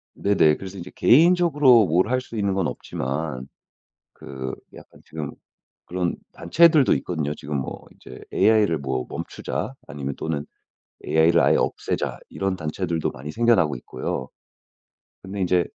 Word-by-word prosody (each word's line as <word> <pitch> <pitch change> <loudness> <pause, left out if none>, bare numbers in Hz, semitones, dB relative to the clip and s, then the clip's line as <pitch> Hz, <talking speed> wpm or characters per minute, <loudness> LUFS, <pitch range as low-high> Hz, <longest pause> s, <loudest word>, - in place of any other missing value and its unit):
네네. 85 -7 +3
그래서 95 0 -9
이제 90 0 -8
개인적으로 150 - +5
뭘 90 +6 +2
할 130 +1 +2
수 115 -3 -9
있는 100 -2 0
건 95 -4 0
없지만 65 -1 -4 0.7
그 65 -1 -7 0.2
약간 - - -15
지금 75 -3 -6 0.5
그런 90 -1 -2 0.2
단체들도 155 - +4
있거든요. 75 -4 -2
지금 75 0 -4
뭐 65 - -6
이제 - - -12
"AI를 105 -6 +3
뭐 65 -2 -3
멈추자." - - -5
아니면 70 -1 -5
또는 75 -3 -3 0.6
"AI를 80 +2 +4
아예 - - +4
없애자." - - -2
이런 95 -1 -2
단체들도 85 0 -2
많이 70 +3 -8
생겨나고 105 - +3
있고요. 65 +1 -5 0.9
근데 95 +1 -6
이제 90 -1 +2
85 Hz, 305 characters per minute, -23 LUFS, 75-105 Hz, 0.9 s, 개인적으로